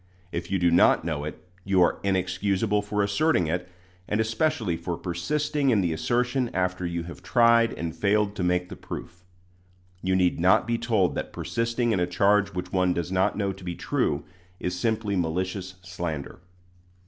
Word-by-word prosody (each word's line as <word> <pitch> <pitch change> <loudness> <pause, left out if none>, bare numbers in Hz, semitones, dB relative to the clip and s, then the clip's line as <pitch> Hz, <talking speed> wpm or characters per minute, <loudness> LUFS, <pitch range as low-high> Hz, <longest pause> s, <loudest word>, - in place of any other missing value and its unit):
If 85 0 -4
you 95 - +1
do 85 -1 +3
not 85 -2 +5
know 75 -3 -2
it, 75 - -8 0.2
you 95 -1 +2
are - - +1
inexcusable 95 +2 0
for 105 0 -1
asserting 100 - +2
it, 90 +3 -2 0.4
and 105 - 0
especially 110 - 0
for 85 +1 -4
persisting 140 +11 -1
in 110 -5 +4
the 85 -3 0
assertion 125 - 0
after 90 -1 0
you 85 -1 -3
have 85 0 -9
tried 115 -1 +4
and 85 -1 -4
failed 100 +4 +1
to 90 - -1
make 90 0 +1
the - - -7
proof. 90 +1 -8 0.8
You 95 0 +1
need 90 -2 +2
not 95 +5 +4
be 115 0 -1
told 110 -7 +1
that - - -4
persisting 115 0 -1
in 100 - +1
a 90 - +1
charge 100 +2 +2
which 90 - -5
one 90 -1 +2
does 85 +1 -3
not 95 +1 +1
know 100 -2 0
to 95 - -13
be 90 -1 -4
true, - - -1 0.3
is 90 - -2
simply 110 +1 -1
malicious 95 +2 -2
slander. 85 -4 -5
95 Hz, 180 wpm, -26 LUFS, 90-110 Hz, 0.8 s, not